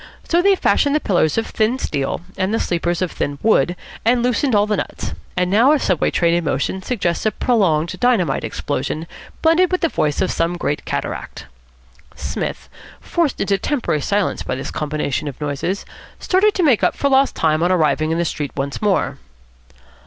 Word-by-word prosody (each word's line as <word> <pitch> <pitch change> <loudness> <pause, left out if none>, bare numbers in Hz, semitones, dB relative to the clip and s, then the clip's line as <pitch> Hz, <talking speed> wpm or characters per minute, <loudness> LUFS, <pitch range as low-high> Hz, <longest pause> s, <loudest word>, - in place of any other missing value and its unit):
So 340 +1 +3
they 395 +1 +4
fashioned 285 -5 +2
the - - +3
pillars 175 - +1
of 225 - +1
thin 220 +3 0
steel, 140 - -2
and 190 +1 -1
the 225 - +1
sleepers 175 +1 -1
of 180 - -2
thin 145 0 -3
wood, 175 -6 +3 0.3
and 240 +1 +3
loosened 250 0 +1
all 205 0 +4
the 210 -1 0
nuts, - - -4 0.2
and 180 0 +1
now 235 +8 +5
a 305 - +2
Subway 185 - +1
train 170 -1 +2
in 175 0 +1
motion 150 +6 -1
suggests 190 -6 -1
a - - +2
prolonged 180 -9 +1
dynamite 245 -8 +2
explosion 145 +3 -3 0.4
blended 330 +3 +4
with 365 - 0
the 330 - +2
voice 150 - 0
of 185 - +1
some 170 +1 -1
great 145 -3 -2
cataract. - - -4 0.7
Psmith, - - -4 0.3
forced 335 -6 -1
into 195 0 +1
temporary 245 - -1
silence 200 +6 0
by - - -3
this 135 +1 -5
combination 150 -1 -2
of 140 - -6
noises, 150 +6 -3 0.3
started 400 +3 +2
to 370 - +1
make 265 -9 +3
up - - +2
for 280 - 0
lost 270 0 +3
time 155 -1 +1
on 175 +2 +2
arriving 155 -3 +2
in 165 - 0
the 170 - 0
street 145 -3 -3
once 140 0 -3
more. 205 -3 0
185 Hz, 190 wpm, -19 LUFS, 155-250 Hz, 0.7 s, now